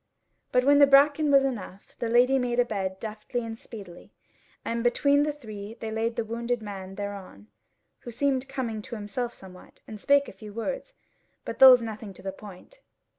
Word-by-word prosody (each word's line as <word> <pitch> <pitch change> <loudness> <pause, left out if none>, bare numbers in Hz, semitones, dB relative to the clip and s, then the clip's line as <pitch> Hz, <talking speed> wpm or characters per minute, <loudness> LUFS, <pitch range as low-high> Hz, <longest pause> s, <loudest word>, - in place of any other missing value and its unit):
But 250 0 +2
when 285 +1 +5
the 285 - +8
bracken 285 +2 +5
was 275 -1 +6
enough, 210 -7 -5
the 235 - -2
Lady 250 +3 +4
made 245 -1 -1
a 245 - +4
bed 190 -4 -3
deftly 220 +2 -5
and 225 0 -6
speedily; 200 -6 -12 0.5
and 230 0 -2
between 280 +4 +3
the 300 +1 +1
three 215 -6 -9
they 220 - -5
laid 225 +1 -1
the 230 -2 -2
wounded 235 +2 -2
man 195 -3 -8
thereon, 195 - -8 0.5
who - - -10
seemed 265 +2 -1
coming 240 -5 -4
to 240 +3 -8
himself 230 +3 -4
somewhat, 185 -1 -15
and 215 -2 -9
spake 280 0 +3
a - - -9
few 205 +2 -11
words, - - -5 0.5
but - - -6
those 255 -2 +9
nothing 215 -2 -7
to 185 - -16
the 195 - -3
point. 205 - -13
230 Hz, 185 wpm, -27 LUFS, 205-265 Hz, 0.5 s, those